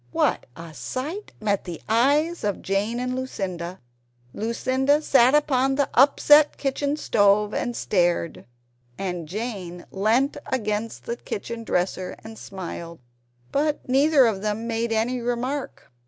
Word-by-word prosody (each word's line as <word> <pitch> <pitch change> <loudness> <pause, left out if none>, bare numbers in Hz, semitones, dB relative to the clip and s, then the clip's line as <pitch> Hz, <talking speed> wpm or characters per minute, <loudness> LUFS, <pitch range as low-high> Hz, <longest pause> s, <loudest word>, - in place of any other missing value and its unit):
What - - +1
a 165 -1 -10
sight 300 - -5
met 205 -2 0
the 175 -3 -6
eyes 290 +9 +2
of 205 -2 -2
Jane 205 +5 -1
and 250 0 -2
Lucinda! 185 -9 -4 0.5
Lucinda 260 +6 +1
sat 265 -3 +4
upon 270 -2 +2
the 285 0 0
upset 295 +3 +5
kitchen 285 +1 -1
stove 205 -5 +3
and 240 - -2
stared; 175 -5 0 0.5
and 180 -4 -4
Jane 190 -3 -5
leant 225 +8 +1
against 215 -3 -2
the 235 - -4
kitchen 230 +2 -6
dresser 185 -2 -1
and 220 0 -10
smiled 170 -3 -7 0.5
but 295 +1 0
neither 275 +1 +5
of 210 -4 0
them 210 +2 -2
made 230 0 -1
any 230 +3 0
remark. 245 +4 -3
230 Hz, 130 wpm, -24 LUFS, 195-265 Hz, 0.5 s, upset